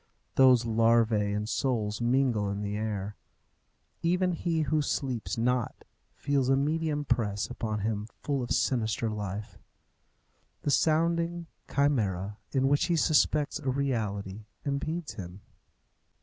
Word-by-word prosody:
Those 130 -2 +6
larvæ 115 -2 +3
and 105 0 -3
souls 110 -4 -1
mingle 120 -4 +2
in 100 +1 -3
the 100 0 -3
air. 105 -1 -3 0.8
Even 180 +2 +2
he 165 -1 -1
who 155 +1 +1
sleeps 130 -5 -2
not 125 0 0 0.3
feels 140 -2 0
a 135 - +5
medium 150 +1 0
press 105 -6 0
upon 110 -4 -3
him 105 0 -2 0.2
full 140 -2 0
of 120 - -4
sinister 110 -2 0
life. 105 0 -5 1.0
The 145 - +1
surrounding 170 +2 +2 0.3
chimera, 105 -8 0
in 135 -1 +2
which 145 +1 +3
he 170 -1 +1
suspects 150 -2 +2
a 140 -3 -2
reality, 110 -7 -2 0.2
impedes 150 +3 -2
him. 95 0 -8
125 Hz, 125 wpm, -29 LUFS, 105-145 Hz, 1.0 s, Those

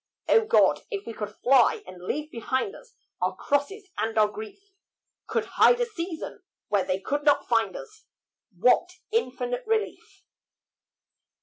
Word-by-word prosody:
O 450 - +5
God! 440 +2 +4
if 410 -4 -4
we 230 - -6
could 210 -1 -6
fly 255 -1 +4
and 185 -1 -11
leave 300 +10 -3
behind 260 - -2
us - - -16 0.3
Our 185 +1 0
crosses 360 - -2
and 225 0 -1
our 215 -1 +6
grief, 405 -2 -10 0.6
Could - - -1 0.2
hide 485 - +7
a 485 - +2
season 345 -7 -6 0.3
where 200 -2 +2
they 185 0 -1
could 290 +9 -2
not 290 -1 +3
find 230 - +1
us, 460 -4 -12 0.5
What 250 - +4 0.2
infinite 250 - -1
relief. 440 -1 -2
290 Hz, 145 wpm, -26 LUFS, -, 0.6 s, hide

